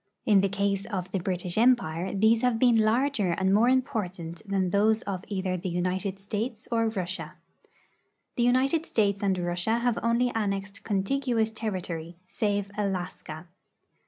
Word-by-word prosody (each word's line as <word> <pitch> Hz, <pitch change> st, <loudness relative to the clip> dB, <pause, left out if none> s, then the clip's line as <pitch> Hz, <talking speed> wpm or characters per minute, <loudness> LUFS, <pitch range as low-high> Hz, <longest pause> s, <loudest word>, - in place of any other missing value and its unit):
In 205 Hz, -3 st, +5 dB
the 195 Hz, -, +1 dB
case 200 Hz, 0 st, -1 dB
of 185 Hz, -4 st, -4 dB
the 190 Hz, -, -1 dB
British 180 Hz, +1 st, -1 dB
empire, 195 Hz, -8 st, +2 dB
these 220 Hz, +3 st, +3 dB
have 250 Hz, -2 st, +2 dB
been 240 Hz, 0 st, +4 dB
larger 220 Hz, -2 st, +2 dB
and 190 Hz, +2 st, +1 dB
more 225 Hz, +4 st, +5 dB
important 190 Hz, -11 st, -2 dB
than 190 Hz, -2 st, 0 dB
those 215 Hz, +3 st, +3 dB
of 190 Hz, -2 st, -4 dB
either 190 Hz, -3 st, -2 dB
the 185 Hz, +1 st, -4 dB
United 185 Hz, +3 st, -2 dB
States 210 Hz, +3 st, -4 dB
or 230 Hz, -1 st, +2 dB
Russia. 190 Hz, -4 st, -4 dB, 1.0 s
The -, -, -1 dB
United 265 Hz, +7 st, +2 dB
States 200 Hz, -3 st, +1 dB
and 195 Hz, -2 st, +1 dB
Russia 175 Hz, +5 st, 0 dB
have 235 Hz, -1 st, 0 dB
only 235 Hz, +2 st, +2 dB
annexed 200 Hz, -2 st, -2 dB
contiguous 225 Hz, +2 st, 0 dB
territory, 175 Hz, -6 st, -5 dB
save 205 Hz, 0 st, -1 dB
Alaska. 180 Hz, -5 st, -4 dB
200 Hz, 150 wpm, -27 LUFS, 185-230 Hz, 1.0 s, In